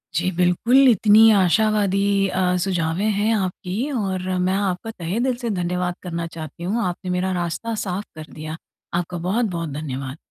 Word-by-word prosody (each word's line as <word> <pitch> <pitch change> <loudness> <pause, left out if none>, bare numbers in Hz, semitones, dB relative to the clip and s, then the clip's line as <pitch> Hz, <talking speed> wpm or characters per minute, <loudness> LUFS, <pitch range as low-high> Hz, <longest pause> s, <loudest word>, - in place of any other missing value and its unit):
जी, 180 +3 +1
बिल्कुल। 230 +10 +4
इतनी 220 0 +6
आशावादी 200 0 +3 0.3
अ, 180 -1 +1
सुझावें 175 0 -1
हैं 210 +3 +1
आपकी 190 +6 -2
और 190 -7 -2 0.2
मैं 185 - +1
आपका 195 +2 -1
तहे 185 +1 -3
दिल 255 0 +1
से 235 - -1
धन्यवाद 180 -2 -1
करना 170 -2 -4
चाहती 165 0 -9
हूँ, 210 +7 -1
आपने 180 +1 -3
मेरा 185 +1 0
रास्ता 175 +7 -3
साफ़ 190 +2 -3
कर 155 0 -10
दिया। 155 +1 -6 0.4
आपका 175 +1 -2
बहुत-बहुत 180 -2 -1
धन्यवाद। 135 -2 -5
185 Hz, 155 wpm, -22 LUFS, 170-210 Hz, 0.4 s, इतनी